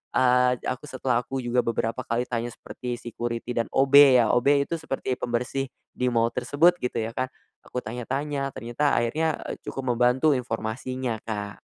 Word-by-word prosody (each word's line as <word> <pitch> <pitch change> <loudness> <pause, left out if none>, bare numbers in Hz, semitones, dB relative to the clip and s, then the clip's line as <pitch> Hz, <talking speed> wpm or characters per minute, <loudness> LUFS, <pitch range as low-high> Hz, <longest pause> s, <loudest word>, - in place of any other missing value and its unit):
Eee, 125 0 +4
aku 150 +4 -3
setelah 130 -2 0
aku 135 +2 -5
juga 120 +1 +1
beberapa 115 +1 -1
kali 115 +2 0
tanya 120 -1 -2
seperti 120 +1 -6
security 120 0 -4
dan 115 -1 0
OB 135 +1 +1 0.2
ya, 115 -3 +4
OB 140 +3 +4
itu - - -5
seperti 135 -4 -3
pembersih 125 +3 -1 0.3
di 125 - -1
mall 115 -1 +2
tersebut, 145 +8 +4
gitu 125 - -2
ya 115 - -4
kan, 130 +2 -1 0.4
aku 125 - -4
tanya-tanya, 135 +5 -3
ternyata 125 +4 0
akhirnya, 155 +7 +1
eee, - - -4
cukup 135 - -4
membantu 125 +5 +4
informasinya, 120 +1 -3
Kak. 105 -2 -3
125 Hz, 165 wpm, -26 LUFS, 120-135 Hz, 0.4 s, Eee